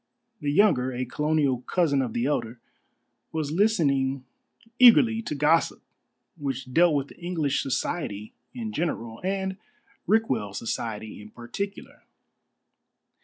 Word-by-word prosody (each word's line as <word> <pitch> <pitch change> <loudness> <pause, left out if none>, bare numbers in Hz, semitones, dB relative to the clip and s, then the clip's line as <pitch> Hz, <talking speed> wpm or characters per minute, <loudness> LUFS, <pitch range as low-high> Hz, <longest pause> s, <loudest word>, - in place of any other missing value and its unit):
The 145 -3 -1
younger 145 -8 +3
a 125 0 -3
colonial 145 -1 0
cousin 145 -2 +1
of 120 -4 -3
the 120 - 0
elder 120 -4 -2 0.7
was 155 -2 -2
listening 140 - +1 0.5
eagerly 230 -2 +7
to 155 - -4
gossip 150 +4 +2 0.6
which 135 -3 -4
dealt 170 0 +5
with 140 0 -2
English 170 -5 -1
society 115 - -3 0.2
in 225 -3 -6
general, 115 - -3
and 190 0 -2 0.5
Rickwell 130 - +1
society 110 -2 -4
in 105 - -12
particular. 120 - -7
145 Hz, 115 wpm, -26 LUFS, 125-175 Hz, 0.7 s, eagerly